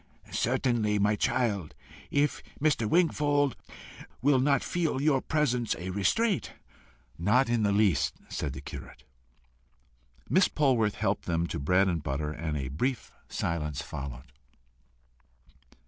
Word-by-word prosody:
"Certainly, 120 -4 +1
my 105 +1 +2
child, 100 -7 0 0.3
if 145 +1 +1 0.2
Mr. 140 -7 +1
Wingfold 145 -5 +2 0.6
will 135 +1 +3
not 140 0 +2
feel 165 -6 -1
your 140 -2 +2
presence 125 -7 0
a 90 +2 -5
restraint." 190 - +1 0.7
"Not 110 +9 +3
in 120 -1 +2
the 100 -1 +2
least," 100 -9 +2
said - - -3
the - - -7
curate. - - -9 1.2
Miss 185 +1 +4
Polwarth 125 -8 +2
helped 105 -2 -1
them 85 -1 0
to 85 - -4
bread 90 +7 +3
and 85 -4 0
butter, 70 +2 -2
and 75 -1 -3
a 65 -2 -3
brief 125 - -2 0.2
silence 75 -4 -2
followed. 65 -1 -7
110 Hz, 125 wpm, -29 LUFS, 85-140 Hz, 1.2 s, Miss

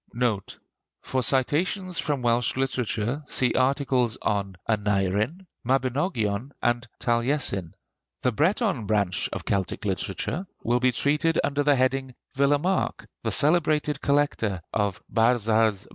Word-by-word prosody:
NOTE. 115 -5 -1 0.5
For 130 - -1
citations 165 - +1
from 145 -4 -1
Welsh 120 0 +1
literature 130 -1 -1
see 125 -2 +2
articles 130 -3 +1
on 100 -2 -1
Aneurin, 105 - 0 0.2
Mabinogion, 130 - 0
and 120 0 0
Taliesin. 120 - 0 0.5
The 125 - +3
Breton 165 - +1
branch 100 -4 0
of - - -5
Celtic 100 +1 -2
literature 105 - -2 0.2
will 120 +1 +2
be 130 0 +3
treated 150 +6 +1
under 145 0 0
the 145 0 +4
heading 130 0 0 0.2
'Villemarqué,' 145 +7 +1 0.2
the - - -2
celebrated 150 -2 +3
collector 140 - 0
of 100 -4 -1
'Barzaz 110 -3 +2
Breiz.' - - -20
125 Hz, 120 wpm, -25 LUFS, 110-145 Hz, 0.5 s, the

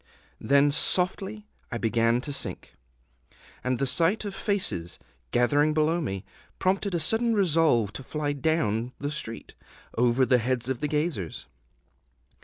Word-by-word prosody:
Then 140 +1 +3
softly 190 +7 +1 0.3
I 120 - -2
began 115 +1 +1
to 145 +1 -5
sink; 140 - 0 0.9
and 125 0 0
the 135 - 0
sight 170 +10 +2
of 200 - -4
faces, 195 - -1 0.3
gathering 145 +5 +2
below 160 +2 +2
me, 95 - -4 0.3
prompted 190 0 0
a - - +1
sudden 225 +8 +2
resolve 160 - +2
to 135 - -7
fly 145 +1 -2
down 130 -6 0
the 145 +1 -4
street, 115 -6 -6 0.4
over 120 +2 +3
the 125 -1 +3
heads 125 0 -1
of 130 -2 -2
the 150 - -1
gazers. 150 - -2
145 Hz, 140 wpm, -26 LUFS, 120-170 Hz, 0.9 s, Then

